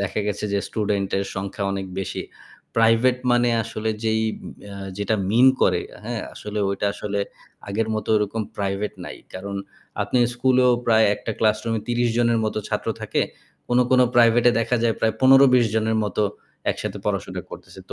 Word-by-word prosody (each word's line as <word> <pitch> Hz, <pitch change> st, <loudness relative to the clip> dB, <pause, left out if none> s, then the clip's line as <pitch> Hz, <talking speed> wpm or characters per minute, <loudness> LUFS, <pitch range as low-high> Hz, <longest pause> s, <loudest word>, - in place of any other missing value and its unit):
দেখা 100 Hz, +2 st, -1 dB
গেছে 105 Hz, 0 st, -2 dB
যে, 100 Hz, -, +2 dB
স্টুডেন্টের 100 Hz, -2 st, -1 dB
সংখ্যা 100 Hz, +1 st, -4 dB
অনেক 95 Hz, -1 st, -3 dB
বেশি। 95 Hz, -, -3 dB, 0.5 s
প্রাইভেট 115 Hz, +3 st, +4 dB
মানে 120 Hz, 0 st, +3 dB
আসলে 110 Hz, 0 st, -3 dB
যেই 110 Hz, 0 st, +1 dB, 0.2 s
উম -, -, -7 dB, 0.2 s
আ -, -, -8 dB, 0.2 s
যেটা 110 Hz, +2 st, 0 dB
মিন 120 Hz, +4 st, +5 dB, 0.2 s
করে, 90 Hz, -1 st, +3 dB, 0.2 s
হ্যাঁ 115 Hz, -1 st, -3 dB
আসলে 105 Hz, 0 st, -6 dB
ওইটা 100 Hz, +1 st, -1 dB
আসলে 100 Hz, -1 st, -3 dB, 0.5 s
আগের 110 Hz, +2 st, -1 dB
মতো 110 Hz, -, -4 dB
ওরকম 105 Hz, +2 st, -1 dB, 0.2 s
প্রাইভেট 100 Hz, +1 st, -2 dB
নাই। -, -, -7 dB, 0.2 s
কারণ 100 Hz, +2 st, -5 dB, 0.5 s
আপনি 125 Hz, -, 0 dB, 0.2 s
স্কুলেও 125 Hz, 0 st, +3 dB, 0.2 s
প্রায় 110 Hz, -1 st, +5 dB
একটা -, -, -6 dB
ক্লাসরুমে 110 Hz, +1 st, +1 dB
৩০ 120 Hz, 0 st, +1 dB
জনের 115 Hz, -1 st, +3 dB
মতো 110 Hz, -, -1 dB
ছাত্র -, -, -2 dB
থাকে। -, -, 0 dB, 0.5 s
কোনো, 125 Hz, +1 st, +4 dB
কোনো 130 Hz, -1 st, +6 dB
প্রাইভেটে 120 Hz, +1 st, +6 dB
দেখা 125 Hz, +2 st, +1 dB
যায় 115 Hz, -1 st, +2 dB
প্রায় 110 Hz, -1 st, +1 dB
১৫-২০ 130 Hz, -2 st, +6 dB
জনের 110 Hz, 0 st, +1 dB
মতো 105 Hz, +1 st, -1 dB, 0.5 s
একসাথে -, -, -4 dB
পড়াশোনা -, -, -2 dB
করতেছে। -, -, -11 dB
তো -, -, -6 dB
110 Hz, 165 wpm, -23 LUFS, 100-120 Hz, 0.5 s, কোনো